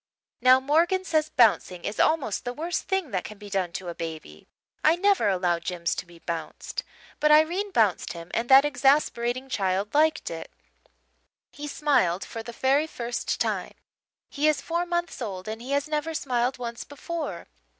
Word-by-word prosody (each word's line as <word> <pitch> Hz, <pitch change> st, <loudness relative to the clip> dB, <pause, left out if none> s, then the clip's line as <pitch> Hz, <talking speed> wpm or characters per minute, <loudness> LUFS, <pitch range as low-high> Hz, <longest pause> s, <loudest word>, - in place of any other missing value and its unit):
Now, 255 Hz, +1 st, +7 dB
Morgan 335 Hz, +7 st, +2 dB
says 310 Hz, -3 st, +1 dB
bouncing 210 Hz, -, +2 dB
is 205 Hz, -, -4 dB
almost 310 Hz, -10 st, +2 dB
the 245 Hz, 0 st, -4 dB
worst 335 Hz, +3 st, -3 dB
thing 385 Hz, -8 st, -1 dB
that 185 Hz, -2 st, -1 dB
can 215 Hz, -, -9 dB
be 205 Hz, 0 st, -11 dB
done 190 Hz, -3 st, 0 dB
to 185 Hz, -, -5 dB
a 170 Hz, -, -3 dB
baby. 160 Hz, -, -8 dB, 0.4 s
I 310 Hz, +2 st, +5 dB
never 395 Hz, -, +3 dB
allow 180 Hz, -3 st, +1 dB
Jims 170 Hz, -1 st, -2 dB
to 185 Hz, -, -5 dB
be 170 Hz, 0 st, -15 dB
bounced. 165 Hz, -1 st, -5 dB, 0.4 s
But 300 Hz, -, +3 dB
Irene 330 Hz, +7 st, +4 dB
bounced 220 Hz, -, +1 dB
him 170 Hz, 0 st, -10 dB
and 235 Hz, +1 st, -1 dB
that 270 Hz, +1 st, +8 dB
exasperating 270 Hz, -3 st, +1 dB
child 195 Hz, -4 st, -1 dB
liked 310 Hz, +1 st, +2 dB
it. 165 Hz, -, -6 dB, 1.0 s
He 295 Hz, +3 st, -7 dB
smiled 255 Hz, -, +1 dB
for 225 Hz, -, -6 dB
the 235 Hz, -, -8 dB
very 270 Hz, +6 st, +2 dB
first 240 Hz, -5 st, -3 dB
time. -, -, -2 dB, 0.5 s
He 295 Hz, +2 st, 0 dB
is 305 Hz, -1 st, +3 dB
four 340 Hz, +1 st, -2 dB
months 345 Hz, -4 st, -2 dB
old 190 Hz, -4 st, -5 dB
and 220 Hz, +1 st, -5 dB
he 250 Hz, -, -9 dB
has 285 Hz, +1 st, +1 dB
never 305 Hz, +1 st, -2 dB
smiled 250 Hz, -3 st, 0 dB
once 235 Hz, -1 st, -5 dB
before. 285 Hz, -, -5 dB
255 Hz, 175 wpm, -26 LUFS, 195-310 Hz, 1.0 s, that